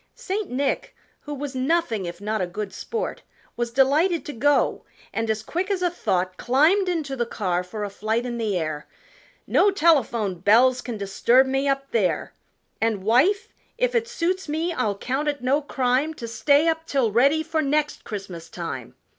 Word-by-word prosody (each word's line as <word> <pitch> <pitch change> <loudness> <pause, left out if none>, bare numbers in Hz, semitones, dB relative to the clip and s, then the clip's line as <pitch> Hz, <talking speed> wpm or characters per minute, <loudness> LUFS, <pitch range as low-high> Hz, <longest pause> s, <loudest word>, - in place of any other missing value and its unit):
St. 430 -4 -3
Nick, 270 +3 -2 0.2
who 295 - -7
was 280 0 -5
nothing 260 - 0
if 170 0 -7
not 215 0 -2
a 180 - 0
good 195 +2 -5
sport, 455 - -4 0.3
Was 240 0 -2
delighted 290 +8 +2
to 295 - -5
go, 290 +5 +2 0.3
and 225 0 -2
as 220 0 -1
quick 360 - -2
as 380 -2 0
a 355 - +2
thought 185 - -1
Climbed 320 +10 +3
into 310 -6 -2
the 240 -2 -1
car 180 -5 -1
for 210 +4 -6
a 205 - -3
flight 220 +4 -1
in 240 -1 -4
the 210 -4 0
air 155 -3 -3 0.6
"No 410 - +4
telephone 255 - +2
bells 245 +7 +4
can 240 -3 -5
disturb 235 +6 +3
me 270 +1 0
up 275 0 -1
there! 205 -6 0 0.5
And, 220 -4 0
wife, 270 - +3 0.3
if - - +1
it 465 -1 +1
suits 375 -6 -2
me 325 +3 -1
I'll 215 -8 -1
count 265 +7 -2
it 285 -3 -2
no 275 +4 +2
crime 270 +2 0
To 235 - -6
stay 285 +6 +3
up 325 0 0
till 260 -6 +1
ready 280 +8 +3
for 320 0 -1
next 295 +1 0
Christmas 185 -5 -7
time!" 140 -9 -6
260 Hz, 180 wpm, -24 LUFS, 215-315 Hz, 0.6 s, No